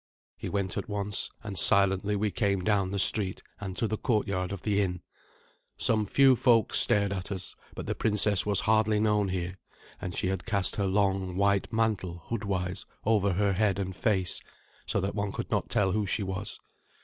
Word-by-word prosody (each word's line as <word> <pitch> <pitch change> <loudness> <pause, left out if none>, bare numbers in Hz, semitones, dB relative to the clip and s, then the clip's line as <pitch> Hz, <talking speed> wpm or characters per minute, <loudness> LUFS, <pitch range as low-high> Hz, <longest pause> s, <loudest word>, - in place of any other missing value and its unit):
He - - -6
went 100 -3 -2
at 100 - -4
once, 105 0 -2
and 100 -2 -5
silently 100 +1 +3
we 105 0 0
came 100 -1 0
down 100 -2 +2
the 100 - -3
street 95 -1 +1 0.2
and 95 -2 -6
to 115 - +1
the 110 0 -3
courtyard 100 -6 0
of 100 -3 -6
the 105 -1 +2
inn. 90 -3 -2 0.7
Some 110 -2 +1
few 135 +3 +5
folk 115 -2 +3
stared 100 -1 +3
at 95 +1 -5
us; 95 -2 -4 0.2
but - - -5
the - - -1
princess 105 -2 +2
was 100 -2 +1
hardly 110 -1 +3
known 105 -2 +2
here, 90 0 -3 0.4
and 90 -2 -4
she 90 - 0
had 95 - -2
cast 100 -3 0
her 100 -2 +1
long, 95 -2 0
white 100 0 +2
mantle 105 -7 -1
hoodwise 100 -5 -2 0.2
over 100 -3 +3
her 100 +2 +2
head 100 -1 +1
and 95 -2 -3
face, 95 -6 0 0.5
so 100 - +1
that 95 +1 -2
one 100 -1 -2
could - - -5
not - - 0
tell 95 -2 +2
who 105 +1 0
she 105 +3 0
was. 95 +2 -4
100 Hz, 190 wpm, -29 LUFS, 95-105 Hz, 0.7 s, few